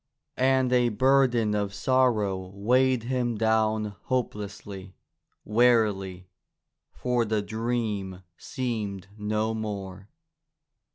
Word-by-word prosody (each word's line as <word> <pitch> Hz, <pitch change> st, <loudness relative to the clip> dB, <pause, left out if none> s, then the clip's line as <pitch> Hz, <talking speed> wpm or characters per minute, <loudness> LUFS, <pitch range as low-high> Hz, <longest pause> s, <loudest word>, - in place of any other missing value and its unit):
And 130 Hz, -1 st, +3 dB
a 125 Hz, -1 st, +4 dB
burden 120 Hz, -2 st, +3 dB
of 100 Hz, -1 st, -2 dB
sorrow 115 Hz, -4 st, +2 dB, 0.2 s
weighed 125 Hz, +4 st, +2 dB
him 120 Hz, -2 st, -1 dB
down 110 Hz, -1 st, +1 dB
hopelessly, 100 Hz, -5 st, -4 dB, 0.5 s
wearily, 105 Hz, -5 st, +2 dB, 0.6 s
for 125 Hz, -1 st, 0 dB
the 110 Hz, -2 st, -1 dB
dream 110 Hz, -4 st, -3 dB
seemed 105 Hz, -8 st, -4 dB
no 105 Hz, +1 st, -1 dB
more. 100 Hz, -3 st, -6 dB
110 Hz, 90 wpm, -27 LUFS, 100-125 Hz, 0.6 s, a